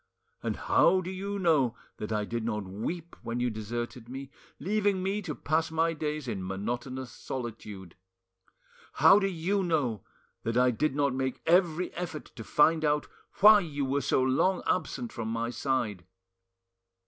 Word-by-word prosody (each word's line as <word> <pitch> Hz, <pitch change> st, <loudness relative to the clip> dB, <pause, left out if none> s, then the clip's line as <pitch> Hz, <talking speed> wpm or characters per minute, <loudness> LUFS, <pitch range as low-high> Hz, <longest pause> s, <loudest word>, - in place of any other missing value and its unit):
And -, -, -2 dB
how 185 Hz, +2 st, +3 dB
do 185 Hz, +1 st, -5 dB
you 200 Hz, +2 st, -4 dB
know 155 Hz, -, +2 dB, 0.2 s
that 105 Hz, -, -5 dB
I 105 Hz, -1 st, 0 dB
did 115 Hz, +1 st, -3 dB
not 105 Hz, -2 st, -2 dB
weep 150 Hz, -, -5 dB
when 115 Hz, +1 st, -3 dB
you 120 Hz, 0 st, +1 dB
deserted 120 Hz, +2 st, -5 dB
me, 135 Hz, +1 st, -7 dB, 0.3 s
leaving 200 Hz, -1 st, +1 dB
me 195 Hz, +2 st, -1 dB
to 165 Hz, -7 st, -5 dB
pass 160 Hz, +2 st, 0 dB
my 165 Hz, +1 st, +1 dB
days 150 Hz, -2 st, -3 dB
in 100 Hz, -5 st, -3 dB
monotonous 120 Hz, +7 st, -4 dB
solitude? 105 Hz, -7 st, -7 dB, 1.0 s
How 200 Hz, -, +7 dB
do 195 Hz, -, +1 dB
you 190 Hz, +2 st, 0 dB
know 145 Hz, -, 0 dB, 0.4 s
that 115 Hz, +1 st, -1 dB
I 125 Hz, 0 st, +5 dB
did 135 Hz, +4 st, 0 dB
not 140 Hz, -2 st, +2 dB
make 130 Hz, 0 st, -2 dB
every 175 Hz, 0 st, +3 dB
effort 170 Hz, -4 st, -6 dB
to 115 Hz, -, -7 dB
find 155 Hz, +9 st, +3 dB
out 150 Hz, -1 st, +2 dB, 0.4 s
why 210 Hz, +1 st, +9 dB
you 145 Hz, -6 st, -3 dB
were 140 Hz, +2 st, 0 dB
so 130 Hz, -, +2 dB
long 155 Hz, +9 st, +2 dB
absent 140 Hz, -9 st, -1 dB
from 115 Hz, -1 st, -4 dB
my 115 Hz, +1 st, -2 dB
side? 120 Hz, -8 st, -1 dB
140 Hz, 160 wpm, -29 LUFS, 115-170 Hz, 1.0 s, why